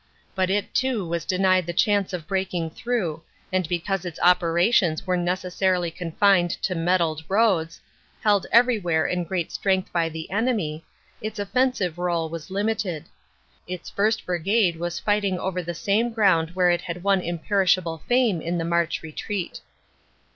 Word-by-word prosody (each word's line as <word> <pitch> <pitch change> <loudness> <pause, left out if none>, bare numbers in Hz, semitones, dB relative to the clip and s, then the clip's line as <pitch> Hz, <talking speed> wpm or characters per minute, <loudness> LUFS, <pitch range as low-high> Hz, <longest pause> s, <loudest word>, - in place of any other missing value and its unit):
But 185 -1 0
it 200 +1 -1
too 250 -8 0
was 170 -1 -3
denied 185 -2 +2
the 175 - -2
chance 205 +2 +2
of 175 -4 -5
breaking 180 -3 -2
through, 185 -8 -2 0.3
and 185 -3 0
because 180 +2 -1
its 175 -3 -7
operations 175 0 +3
were 185 -1 +1
necessarily 180 0 0
confined 180 +2 +2
to 185 - 0
metalled 165 -2 0
roads, 190 -6 +2 0.4
held 205 -2 +3
everywhere 210 - +3
in 180 -1 -1
great 175 -1 -3
strength 190 -1 0
by 165 -2 +1
the 160 +1 -7
enemy, 200 -8 -1 0.4
its 215 0 -5
offensive 205 -5 0
role 170 -2 -1
was 165 -1 -7
limited. 200 -5 -2 0.6
Its 180 -1 -6
1st. 215 +2 0
Brigade 180 +1 +1
was 170 +1 -3
fighting 205 -3 0
over 185 0 -2
the 175 0 -5
same 205 +7 +1
ground 180 -7 +2
where 180 -1 +4
it 175 - 0
had 175 +1 -6
won 195 -1 +3
imperishable 175 -1 0
fame 240 -9 +2
in 170 +2 -2
the 165 - -2
March 170 -1 0
retreat. 170 +4 -5
180 Hz, 155 wpm, -24 LUFS, 170-200 Hz, 0.6 s, where